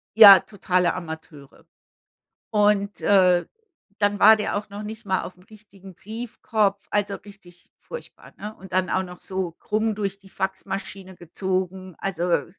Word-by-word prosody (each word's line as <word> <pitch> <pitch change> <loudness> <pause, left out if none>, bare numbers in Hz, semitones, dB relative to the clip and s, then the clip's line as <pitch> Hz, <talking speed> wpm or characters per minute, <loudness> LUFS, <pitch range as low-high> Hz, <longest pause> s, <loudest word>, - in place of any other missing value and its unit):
ja, 205 -3 +11
totale 180 -3 0
Amateure. 160 -5 -9 0.9
Und, 205 -2 +2
äh, 180 -3 +4 0.5
dann 205 -1 +1
war 220 +2 +9
der 210 -1 -2
auch 210 +1 -4
noch 205 +1 -7
nicht 215 0 -8
mal 190 -1 0
aufm 180 0 -10
richtigen 195 -2 -15
Briefkopf, 215 0 -2
also, 205 -1 0
richtig 190 -4 -17
furchtbar, 485 - -11
ne? 210 +1 -7
Und 190 -1 -14
dann 185 0 +1
auch 190 - +1
noch 180 -1 -11
so 185 -3 -3
krumm 215 +5 -1
durch 200 -2 -3
die 195 -1 -18
Faxmaschine 190 0 -5
gezogen, 185 +1 -3
also 175 -2 0
195 Hz, 145 wpm, -24 LUFS, 185-210 Hz, 0.9 s, ja